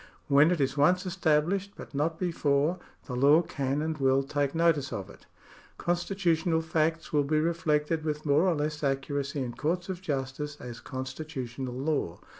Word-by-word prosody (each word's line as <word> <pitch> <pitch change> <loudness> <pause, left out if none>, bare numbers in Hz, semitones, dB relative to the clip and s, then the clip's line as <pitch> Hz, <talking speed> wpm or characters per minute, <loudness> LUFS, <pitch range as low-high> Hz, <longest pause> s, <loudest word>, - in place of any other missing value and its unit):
When 145 +2 +6
it 175 -2 +1
is 135 -1 +1
once 180 +6 +3
established, 180 +2 +1
but - - -11
not 155 +3 0
before, 165 -2 +1 0.3
the 125 - -5
law 145 +6 +5
can 140 -1 -2
and 160 0 -1
will 135 0 +3
take 140 +1 -1
notice 160 -5 +2
of 100 0 -5
it. - - -18 0.5
Constitutional 175 -2 +1
facts 160 0 -1
will 145 -1 +4
be 155 +2 +1
reflected 155 -1 0
with 150 -1 -3
more 150 +5 +4
or 175 - +3
less 150 +1 -2
accuracy 140 0 -1
in 120 -1 -5
courts 175 +6 -2
of 185 -1 -4
justice 145 -1 -3
as 120 -1 -8
constitutional 130 -2 -5
law. 135 - -1
150 Hz, 165 wpm, -29 LUFS, 140-165 Hz, 0.5 s, When